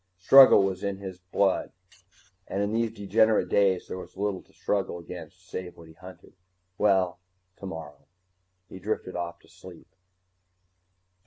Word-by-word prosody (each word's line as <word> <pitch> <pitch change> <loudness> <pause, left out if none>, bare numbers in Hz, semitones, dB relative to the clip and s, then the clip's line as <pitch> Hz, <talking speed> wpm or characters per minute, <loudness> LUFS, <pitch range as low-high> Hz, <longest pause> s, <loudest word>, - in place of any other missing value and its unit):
Struggle 130 +3 +8
was 95 -1 -2
in 100 -1 -2
his 95 -2 -8
blood, 95 +1 0 0.7
and 100 +1 -2
in 100 +1 -2
these 115 0 0
degenerate 105 +2 +2
days 95 -3 +2
there 95 - -6
was 95 - -12
little 100 -2 -2
to - - -27
struggle 95 -3 -2
against 90 +1 -11
save 90 -1 -7
what 85 -1 -14
he - - -15
hunted. 90 +3 -14 0.4
Well 95 -4 +2 0.4
tomorrow 80 -6 -9 0.6
he 95 - -11
drifted 100 -2 -4
off 85 -1 -4
to - - -23
sleep. - - -15
95 Hz, 145 wpm, -27 LUFS, 90-100 Hz, 0.7 s, Struggle